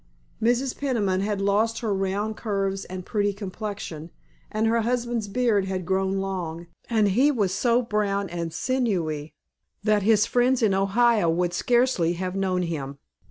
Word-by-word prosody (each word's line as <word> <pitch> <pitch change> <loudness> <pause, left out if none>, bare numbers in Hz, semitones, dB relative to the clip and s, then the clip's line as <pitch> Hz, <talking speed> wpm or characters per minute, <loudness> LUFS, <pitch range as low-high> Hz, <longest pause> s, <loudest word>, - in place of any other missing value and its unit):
Mrs. 245 +3 +1
Peniman 210 -9 0
had 205 0 -1
lost 215 +3 +1
her 220 -3 0
round 195 +3 -1
curves 195 -3 -2
and 185 0 -7
pretty 205 -1 0
complexion, 195 -5 -6 0.4
and 215 +1 0
her 230 +1 +2
husband's 235 -1 -1
beard 215 -2 +1
had 190 -2 -3
grown 190 +1 0
long, 180 -4 -4 0.2
and 220 -3 +3
he 255 +9 +4
was 205 -10 +1
so 240 +4 +2
brown 205 -3 0
and 170 -2 -4
sinewy 170 - -1 0.5
that 210 -1 +3
his 215 +1 +4
friends 245 +1 +2
in 205 -3 +4
Ohio 200 0 +3
would 175 +1 0
scarcely 240 -9 +2
have 185 +1 -4
known 185 -2 0
him. 140 -5 -4
200 Hz, 155 wpm, -25 LUFS, 185-230 Hz, 0.5 s, he